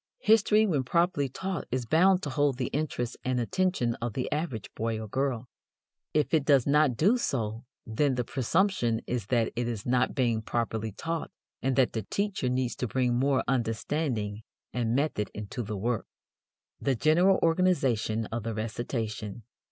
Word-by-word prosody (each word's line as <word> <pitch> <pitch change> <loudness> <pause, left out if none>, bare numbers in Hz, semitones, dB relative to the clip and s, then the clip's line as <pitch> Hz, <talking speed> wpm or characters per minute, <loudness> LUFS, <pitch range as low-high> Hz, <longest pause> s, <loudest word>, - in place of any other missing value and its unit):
History 220 0 +5
when 160 -10 +1
properly 170 -1 +1
taught 190 +6 -4
is 125 -1 -2
bound 180 +8 +4
to 145 - -3
hold 145 -2 +1
the 125 - -2
interest 135 -5 -2
and 130 -1 0
attention 180 -3 0
of 120 -2 -2
the 125 - -3
average 150 - -3
boy 115 0 -2
or 110 - -6
girl. 130 0 -1 0.6
If 150 +1 +1
it 155 -3 +4
does 140 -4 +4
not 145 -4 +3
do 215 +10 +4
so, 115 - -2 0.2
then 130 +5 +1
the 125 - 0
presumption 130 - +1
is 120 -5 -3
that 115 -2 +1
it 120 0 -1
is 115 -4 -4
not 125 0 +1
being 120 -4 +1
properly 110 -1 -2
taught 165 - -4 0.3
and 130 -1 +1
that 130 -3 +3
the 110 - -1
teacher 200 - -1
needs 125 -1 0
to 125 - -2
bring 125 +1 +1
more 135 +2 +2
understanding 115 -3 -1 0.3
and 115 -1 0
method 135 -8 0
into 105 +4 -5
the 105 -2 -4
work. 115 +3 -1 0.7
The 135 -2 +1
General 175 - +4
Organization 135 - +2
of 115 +1 -2
the 115 0 -4
Recitation. 110 -1 -4
125 Hz, 165 wpm, -28 LUFS, 115-150 Hz, 0.7 s, History